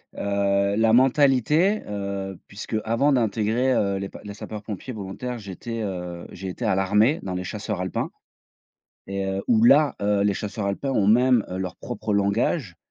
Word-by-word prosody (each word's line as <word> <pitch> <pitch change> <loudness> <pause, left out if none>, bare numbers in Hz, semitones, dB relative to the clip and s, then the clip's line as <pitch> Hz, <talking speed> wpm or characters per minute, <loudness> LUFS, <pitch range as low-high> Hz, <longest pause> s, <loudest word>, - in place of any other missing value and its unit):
heu, 100 0 +1
la 110 0 +3
mentalité, 140 - +4
heu, 100 -2 -4
puisque 105 +2 -6
avant 125 +6 +2
d'intégrer, 115 +2 +1
heu, 100 -3 +1
les 100 0 -4
p - - -11
les 100 -1 -8
sapeurs 105 -1 -7
pompiers 105 +4 -6
volontaires, 110 +4 -5
j'étais, 110 +3 -6
heu, 90 -3 -5
j'ai 95 +1 -6
été 115 +6 -5
à 100 - +2
l'armée 105 - +3
dans 95 -1 -4
les 90 0 -3
chasseurs - - -4
alpins, - - -2 0.9
et 100 0 -3
heu, 95 0 -2
où 115 -1 +5
là, 145 +1 +5
heu, 100 0 +2
les 100 -1 +2
chasseurs 100 0 -4
alpins 135 +8 -2
ont 100 -4 +2
même 125 +1 +5
leur 90 -1 -4
propre 110 -3 -4
langage 100 - 0
105 Hz, 170 wpm, -24 LUFS, 100-120 Hz, 0.9 s, où